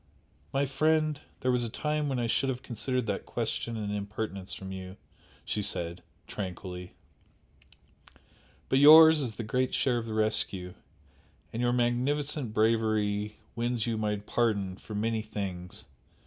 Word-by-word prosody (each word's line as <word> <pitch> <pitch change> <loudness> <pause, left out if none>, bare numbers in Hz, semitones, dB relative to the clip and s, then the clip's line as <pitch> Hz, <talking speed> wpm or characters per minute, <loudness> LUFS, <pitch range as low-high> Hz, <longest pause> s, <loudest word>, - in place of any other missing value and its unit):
"My 135 +1 +1
friend, 155 +2 +1 0.2
there 130 - +2
was 125 -1 +1
a 115 - -2
time 150 +4 -1
when 135 - -1
I 120 - 0
should 135 +4 +1
have 125 -1 -3
considered 125 +1 -2
that - - -3
question 115 -1 -2
an 105 -2 -3
impertinence 100 -1 -4
from 95 0 -6
you!" 95 0 -7 0.5
she 105 - -1
said, 85 -3 -2 0.2
tranquilly 90 -2 -6 1.7
"But 130 - +3
yours 160 +1 +9
is 120 -6 -2
the 115 - -4
great 125 +4 0
share 125 -3 +2
of 115 - -6
the 110 - -4
rescue 95 -4 +1 0.8
and 115 - -2
your 120 0 +2
magnificent 125 +2 +1
bravery 110 -1 +1 0.2
wins 120 -1 -1
you 115 -1 -1
my 105 -1 0
pardon, 100 -2 0
for 105 +2 -9
many 110 +1 0
things!" 95 -4 -6
115 Hz, 150 wpm, -29 LUFS, 105-130 Hz, 1.7 s, yours